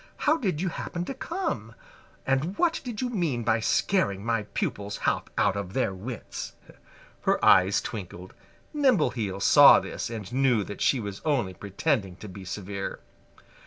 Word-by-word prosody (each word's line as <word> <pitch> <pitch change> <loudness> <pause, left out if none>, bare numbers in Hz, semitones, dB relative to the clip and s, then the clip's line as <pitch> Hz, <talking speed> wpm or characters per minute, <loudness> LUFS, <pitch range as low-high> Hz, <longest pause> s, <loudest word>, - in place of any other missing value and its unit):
How 300 - +3
did 190 - -1
you 185 +1 0
happen 170 +1 -4
to 270 - -4
come? 340 +8 -4 0.5
And 135 +9 0
what 335 -2 +1
do 250 - -4
you 255 - -1
mean 160 - -1
by 110 0 +2
scaring 110 - +1
my 115 -3 0
pupils 100 0 -2
half - - 0
out 100 -1 +3
of 100 -2 -5
their 125 -7 0
wits?" 110 +6 -7 0.7
Her - - +1
eyes 95 +2 +6
twinkled. 95 -4 -7 0.4
Nimbleheels 150 - +1
saw - - +8
this - - -5
and 110 -2 -7
knew 130 -5 +3
that 100 - -8
she 135 - +3
was 100 -3 -6
only 130 -12 0
pretending 100 - -1
to 105 - -10
be 95 0 -9
severe. 100 +1 -5
115 Hz, 160 wpm, -27 LUFS, 100-165 Hz, 0.7 s, saw